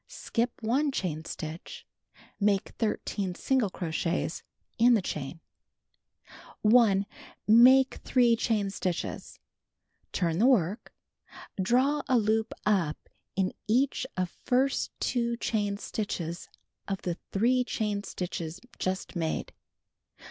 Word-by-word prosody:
Skip 240 - -3
1 275 +6 +2
chain 160 - -3
stitch. 160 +2 -7 0.5
Make 200 -2 +2
13 200 -4 -1
single 260 -3 +1
crochets 170 -1 -2 0.4
in 240 +1 +6
the 215 - +2
chain. 155 0 -5 1.2
1. 210 -3 +5 0.4
Make 255 +4 +7
3 240 -2 +4
chain 215 -4 0
stitches. 185 -3 -4 0.7
Turn 170 -2 0
the 235 - +5
work. 215 -4 +2 0.7
Draw 260 +9 +2
a 260 -2 +4
loop 220 0 +1
up 185 -8 0 0.3
in 190 0 0
each 260 +3 +1
of 180 -1 -1
first 265 +2 +1
two 235 -1 0
chain 205 -3 -1
stitches 175 -6 -4 0.4
of 195 -1 -3
the 175 -1 -3
three 245 +5 +3
chain 210 -4 -2
stitches 175 -3 -5 0.2
just 190 +1 -2
made. 165 -2 -2
210 Hz, 110 wpm, -29 LUFS, 180-240 Hz, 1.2 s, Make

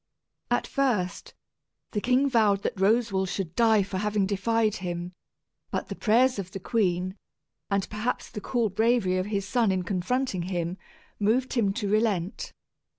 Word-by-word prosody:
At - - +1
first, 240 -10 -1 0.6
the 210 - -1
king 255 +4 +3
vowed 215 -6 +3
that - - -1
Roswal 195 -2 +2
should 175 -2 -4
die 220 -3 +4
for 190 -1 -4
having 210 -1 +1
defied 215 +2 +1
him; 175 0 -4 0.6
but - - -3
the - - -4
prayers 245 +2 +3
of 190 -2 -5
the 195 - -4
queen, 185 -3 0 0.5
and 200 -1 0
perhaps 215 +4 -3
the 210 - -6
cool 235 0 0
bravery 215 -2 +2
of 185 +1 -1
his 200 -2 -2
son 230 -2 +2
in 185 -1 0
confronting 195 +3 -1
him, 175 0 -3 0.4
moved 230 +5 +1
him 220 -6 +2
to 210 -2 -2
relent. 205 -3 0
205 Hz, 155 wpm, -27 LUFS, 185-230 Hz, 0.6 s, die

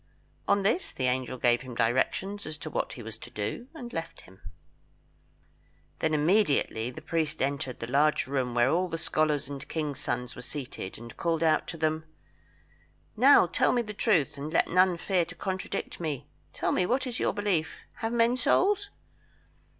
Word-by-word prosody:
On 200 -1 +3
this 225 - +1
the 130 - -5
angel 130 0 0
gave 120 0 +3
him 130 -2 -8
directions 130 - 0
as 155 0 -6
to 155 -1 -7
what - - -2
he 120 - -8
was 110 0 -8
to - - -10
do, 120 - -4
and 245 -6 -8
left 165 0 -5
him. 95 +1 -18 1.6
Then 160 -1 +1
immediately 150 - +2
the 155 +5 -10
priest 160 -1 -1
entered 135 -2 -2
the - - -3
large 145 +5 +2
room 130 -3 -1
where 120 +2 +4
all 180 +2 +1
the 165 - -3
scholars 155 -4 0
and 140 -1 -6
the - - -9
kings' 150 -3 -3
sons 125 -3 -3
were - - -8
seated, 125 -7 -6
and 115 0 -10
called 165 -1 0
out 155 -1 +3
to 170 - -6
them 155 0 0 1.1
"Now, - - +7
tell - - +2
me 240 -1 +2
the 210 -1 -7
truth, 160 - +2
and 145 +2 -5
let 165 - +3
none 180 0 +4
fear 180 0 +1
to 170 +2 -9
contradict 190 +2 -4
me; 155 -5 -3 0.3
tell - - -1
me 180 - +2
what 255 +4 +1
is 245 -3 -4
your - - +2
belief 200 -6 0 0.2
have 225 0 -2
men 235 +1 +3
souls?" 405 +10 +2
155 Hz, 185 wpm, -28 LUFS, 130-190 Hz, 1.6 s, Now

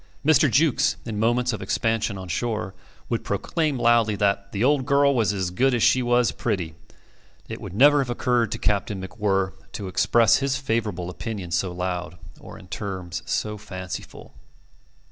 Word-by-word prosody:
Mr. 155 -1 +5
Jukes, 145 +1 +3
in 110 -3 -4
moments 120 +2 +1
of 105 - -5
expansion 110 +1 -1
on 95 -1 -7
shore, 105 +2 -2 0.3
would - - -2
proclaim 155 -5 -1
loudly 115 -3 +3
that 100 0 0
the 100 +2 -1
"old 135 -1 +2
girl 140 0 +4
was 110 -6 +2
as 95 -3 -2
good 130 +7 +2
as 120 - +1
she 130 - +4
was 120 -1 +2
pretty." 85 -5 -2 0.7
It - - -7
would - - -7
never 145 +5 +6
have 135 -3 -1
occurred 120 -2 +1
to - - -3
Captain 100 -1 -1
MacWhirr 95 -1 -1 0.2
to 100 - -5
express 115 +3 +4
his 140 0 0
favourable 110 -9 -2
opinion 100 -4 -6
so 90 +2 0
loud 90 -1 -4 0.2
or - - -11
in 95 - -14
terms 95 -4 -5
so 105 -1 -2
fanciful. 95 -3 -8
105 Hz, 165 wpm, -24 LUFS, 95-125 Hz, 0.7 s, never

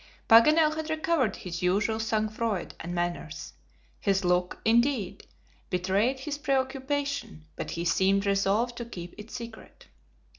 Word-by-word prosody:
Paganel 305 +7 +6
had 315 0 -4
recovered 315 -8 +1
his 170 -2 -6
usual 200 +5 +1
sang 220 -1 0
froid 215 -3 -3
and 175 +2 -5
manners. 175 - -3 0.5
His 195 -1 +1
look, 180 0 +1
indeed, 235 -3 +1 0.4
betrayed 195 +8 +1
his 290 +1 -4
preoccupation, 275 - -2
but - - -5
he 170 0 -3
seemed 195 +3 +2
resolved 200 +5 +1
to 235 - -4
keep 175 -6 -8
it 210 +2 -9
secret. 230 -1 -9
220 Hz, 135 wpm, -28 LUFS, 185-265 Hz, 0.5 s, Paganel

